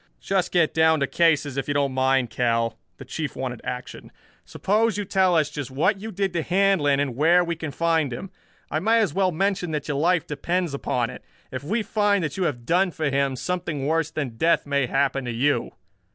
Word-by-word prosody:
"Just 190 -2 -1
get 170 -4 +2
down 160 0 +4
to - - +3
cases, 150 -3 +1
if 135 - -2
you 145 - -1
don't 140 -2 +1
mind, 130 -2 +1
Kell." 115 -1 0 0.2
The 135 - -10
Chief 150 +3 -4
wanted 125 -3 -4
action. 125 0 -7 0.3
"Suppose 215 +2 0
you 205 - -2
tell 190 -2 +2
us 155 -2 +2
just 145 -3 -5
what 175 +10 +1
you 220 +2 -6
did 195 -1 -2
to 170 - 0
Handlon 180 -6 +2
and 140 -4 -1
where 170 +6 +4
we 170 -1 -2
can 160 -1 -5
find 160 -1 0
him. 180 +11 -7 0.4
I 155 - 0
may 225 +7 +3
as 210 -9 +1
well 190 0 +2
mention 190 +1 -1
that 150 -1 -3
your 145 - -1
life 170 +1 +2
depends 170 +3 -2
upon 125 -3 -1
it. - - -11 0.3
If 130 +1 -5
we 215 +9 -1
find 205 -3 +1
that 150 - -3
you 190 - -1
have 120 -7 -3
done 180 +5 +2
for 155 -4 -2
him, 140 -1 +1
something 160 -2 -3
worse 160 +1 +1
than 140 -8 -4
death 170 +7 +2
may 140 -2 0
happen 135 +1 0
to 120 - -3
you." 120 +1 +1
155 Hz, 215 wpm, -24 LUFS, 135-180 Hz, 0.4 s, down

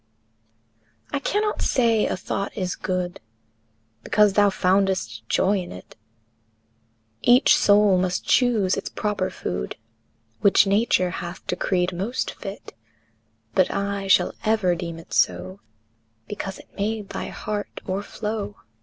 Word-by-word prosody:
II. 110 0 -43 0.2
I 280 - 0
cannot 420 +8 -1
say 230 -4 +2
a - - -2
thought 195 +3 -4
is 185 -3 -2
good 180 -1 -3 0.8
Because 210 -2 +3
thou 205 0 +5
foundest 190 - +1
joy 195 +1 +2
in 180 - -7
it; 90 - -11 1.3
Each 250 +4 +6
soul 205 -7 +5
must 180 0 -1
choose 225 -7 +3
its - - -4
proper 210 -3 -2
food 65 -8 -4 0.6
Which 200 0 +5
Nature 195 -3 +2
hath 175 +2 -7
decreed 180 0 0
most 200 +8 -2
fit; 195 0 -9 0.8
But 185 - +3
I 200 0 -2
shall 190 - +4
ever 215 -5 +2
deem 170 -1 -5
it 165 - -12
so 90 +2 +1 0.7
Because 195 -2 -5
it - - -17
made 210 0 -2
thy - - -4
heart 210 -1 -5
o'erflow. 205 +2 -4
195 Hz, 125 wpm, -24 LUFS, 175-210 Hz, 1.3 s, Each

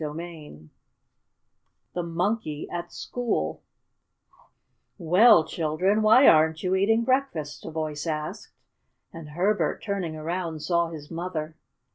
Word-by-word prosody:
CHAPTER 150 +1 -5
II 150 - -10 1.2
THE 180 - -2
MONKEY 170 -2 -2
AT 175 0 -5
SCHOOL 245 -2 -3 1.4
"Well, 180 +1 +5
children, 175 +7 0
why 220 +5 +6
aren't 160 0 +4
you 185 0 0
eating 220 +4 +2
breakfast?" 255 - -1
a - - -5
voice 155 -1 -4
asked, 155 -1 -4 0.6
and 165 -2 -9
Herbert, 190 +7 0
turning 195 -6 -3
around, 165 0 -4
saw 170 -1 +1
his 155 -2 -10
mother. 165 -2 -4
170 Hz, 115 wpm, -26 LUFS, 155-195 Hz, 1.4 s, why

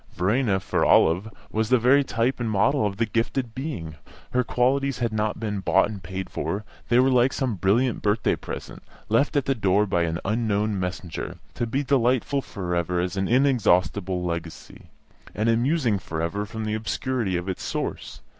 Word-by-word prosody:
Verena, 100 +3 +1
for 95 - -1
Olive, 90 +7 +4 0.2
was 110 0 0
the 130 - +5
very 130 +4 +4
type 125 0 0
and 120 -2 -1
model 110 +3 +2
of 100 -1 -5
the 115 - +2
"gifted 115 +2 -1
being"; 120 - -5 0.3
her 125 0 +2
qualities 135 +2 +1
had 120 -3 -1
not 105 0 -1
been 105 -2 -2
bought 95 +1 +3
and 100 -3 -7
paid 95 +2 -5
for; 90 +8 -3 0.3
they 120 - +4
were 130 +1 +5
like 125 +1 +4
some 130 -5 -1
brilliant 105 +6 +1
birthday 105 +1 +1
present, - - -8 0.3
left 125 +8 +2
at 140 - +1
the 135 - +2
door 105 -3 +2
by 95 -4 0
an 85 -1 0
unknown 105 -1 0
messenger, 90 -2 -4 0.2
to 120 - -2
be 135 +6 -1
delightful 130 0 +1
for 90 -8 -5
ever 85 +1 0
as 90 +1 -2
an 95 0 0
inexhaustible 100 -8 +2
legacy, 85 -1 -6 0.5
and 110 +2 +1
amusing 120 -2 +2
for 80 -3 -5
ever 100 +6 -2
from 110 +1 -5
the 105 - -1
obscurity 110 -2 -1
of 90 +2 -5
its 95 - -3
source. - - -4
110 Hz, 185 wpm, -25 LUFS, 95-125 Hz, 0.5 s, the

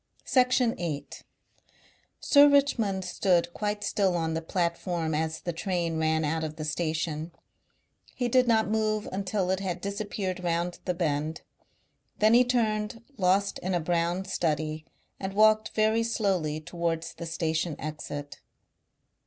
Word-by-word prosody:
Section 250 -2 +3
8. 155 -5 -4 1.0
Sir 290 0 +6
Richmond 230 -10 +2
stood 175 -1 +1
quite 210 0 -2
still 190 -4 +1
on 160 -1 -1
the 165 - -2
platform 170 -1 -1
as 160 +1 -1
the 175 - -3
train 170 -1 -1
ran 160 0 +1
out 160 +2 -1
of 155 -1 -4
the 155 -1 -5
station. 155 0 -2 0.8
He 245 - 0
did 255 +1 +3
not 220 -2 +3
move 215 0 0
until 190 -1 -1
it 190 - 0
had 185 -2 -3
disappeared 200 -2 -4
round 175 0 -1
the 180 - -1
bend. 155 -2 -1 0.8
Then 215 +1 +4
he 245 +1 +7
turned, 225 -2 -1 0.2
lost 195 +2 +2
in 185 0 -2
a - - +2
brown 170 +3 0
study, 155 -4 -1 0.3
and 190 0 -4
walked 215 +1 +5
very 220 +1 +3
slowly 190 -9 0
towards 165 0 -3
the 170 - -7
station 160 -1 -1
exit. 145 -2 -6
180 Hz, 140 wpm, -28 LUFS, 160-210 Hz, 1.0 s, he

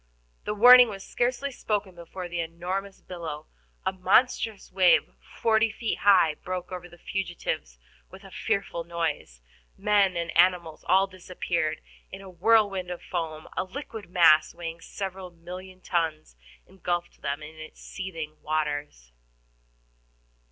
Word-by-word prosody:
The 210 - -2
warning 245 +2 +9
was 195 -2 -7
scarcely 250 +3 -1
spoken 210 -6 -2
before 175 +1 -8
the 175 0 -4
enormous 180 +4 -4
billow, 160 -4 -7 0.4
a - - +1
monstrous 210 +3 +2
wave 185 -1 +4 0.3
forty 225 -1 +3
feet 225 0 -3
high, 185 -6 +5
broke 180 +3 -6
over 180 -1 -7
the 175 - -15
fugitives 175 - -4 0.3
with - - -13
a - - -13
fearful 195 -5 -2
noise. 165 - -3 0.4
Men 200 -3 +3
and 170 -1 -3
animals 170 -2 +3
all 190 +2 +5
disappeared 175 -4 -3 0.3
in 190 - -8
a 190 -1 -11
whirl 210 +3 +4 0.2
of 180 - -6
foam; 160 -3 -4
a - - 0
liquid 220 -1 -8
mass, 165 -4 +5
weighing 165 -1 -6
several 190 -1 -6
millions 180 +2 -10
of - - -13
tons, 160 - -1 0.3
engulfed 175 -2 -4
them 140 +2 -3
in 155 +1 -11
its 155 0 -11
seething 165 -6 -7
waters. 145 - -3
180 Hz, 135 wpm, -27 LUFS, 165-195 Hz, 0.4 s, warning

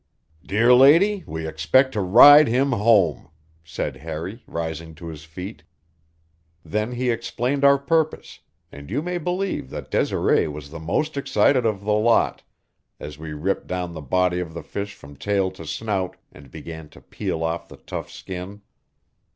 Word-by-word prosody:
"Dear 115 +5 +3
lady, 165 +10 +5
we 80 0 -5
expect 85 - +2
to 105 - -1
ride 145 +11 +8
him 130 +4 +1
home," 105 - +2 0.3
said 80 - -5
Harry, 80 +8 -6
rising 80 -1 -5
to 85 - -11
his 75 -1 -10
feet. 90 +6 -8 1.0
Then 105 +8 -2
he 125 0 0
explained 120 +4 -2
our 140 0 +6
purpose, 160 +3 -1 0.3
and 70 +1 -11
you 135 +9 -2
may 180 0 -3
believe 180 - -3
that - - -8
Desiree - - +1
was 75 -1 -8
the 85 - -7
most 145 - -2
excited 130 -2 +2
of 105 -3 -2
the 105 +1 +1
lot 110 +2 +2 0.6
as 75 0 -9
we 80 -1 -7
ripped 85 +6 -2
down 90 -1 -4
the 80 - -7
body 90 +5 +1
of 85 -2 -6
the 85 - -6
fish 100 0 -6
from 70 0 -14
tail 100 0 0
to 85 -4 -11
snout 95 +1 -3
and 70 -3 -15
began 80 +3 -9
to - - -17
peel 80 - -4
off 80 +1 -3
the - - -13
tough - - -7
skin. 95 +3 -8
95 Hz, 165 wpm, -23 LUFS, 80-125 Hz, 1.0 s, ride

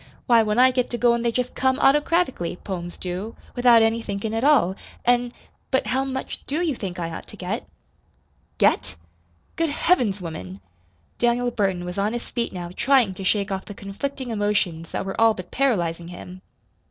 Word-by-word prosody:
Why, 235 -3 +6
when 215 0 0
I 255 +1 +7
get 250 -1 0
to 240 - -3
goin' 235 -1 +3
they 235 0 +1
jest 250 +1 -2
come 260 0 +1
autocratically 295 - +2
poems 175 -3 -5
do 185 +5 -5 0.2
without 245 -2 +6
any 225 +1 +2
thinkin' 210 0 -4
at 225 +2 -1
all; 260 -11 +4 0.3
an' 245 0 +3 0.4
But 265 - +1
how 265 +1 0
much 265 -1 -5
DO 295 +4 -1
you 310 -6 0
think 190 -5 -5
I 170 -1 -3
ought 160 - -7
to - - -12
get?" - - -4 0.9
"Get? - - +2 0.6
Good 330 -1 +1
Heavens 250 - +2
woman!" 100 - -7 0.6
Daniel 245 +1 +2
Burton 190 -5 0
was 180 +2 -4
on 210 +3 0
his 240 - -5
feet 235 -1 -2
now 175 -2 -6
trying 260 -7 +3
to 190 - -8
shake 200 +1 +1
off 190 0 -3
the 205 - -9
conflicting 245 +6 -5
emotions 205 -6 0
that - - -3
were 195 +3 -3
all 225 -1 +5
but 180 -1 -9
paralyzing 175 -11 0
him. 180 +1 -10
225 Hz, 185 wpm, -24 LUFS, 185-250 Hz, 0.9 s, I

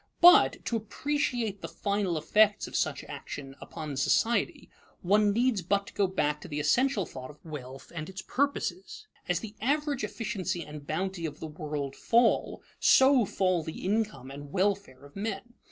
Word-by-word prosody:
But, 355 +3 +7
to 235 - -1
appreciate 235 -2 -2
the - - -4
final 200 -4 -1
effects 210 +7 +3
of - - -8
such - - 0
action 135 -2 -8
upon 155 -3 -6
society, 225 - +1 0.4
one 205 +3 +4
needs 235 -1 +2
but 200 +3 0
to - - -12
go 200 - +2
back 150 -5 -1
to - - -9
the 150 -3 -3
essential 245 - +2
thought 130 -3 -9
of 150 +2 -15
wealth 135 -4 -8
and 160 0 -5
its 190 0 -7
purposes. 285 +9 -2 0.2
As 180 -1 +1
the 215 -2 -7
average 285 +2 0
efficiency 200 -6 -3
and 150 -1 -10
bounty 180 +1 -2
of 150 -1 -9
the - - -5
world 150 -3 -4
fall, 235 0 +2 0.2
so 265 -3 +6
fall 185 -2 +1
the 160 +2 -7
income 210 - -1
and 140 +1 -9
welfare 190 -8 -1
of 140 - -16
men. 225 +3 -4
195 Hz, 170 wpm, -29 LUFS, 150-225 Hz, 0.4 s, But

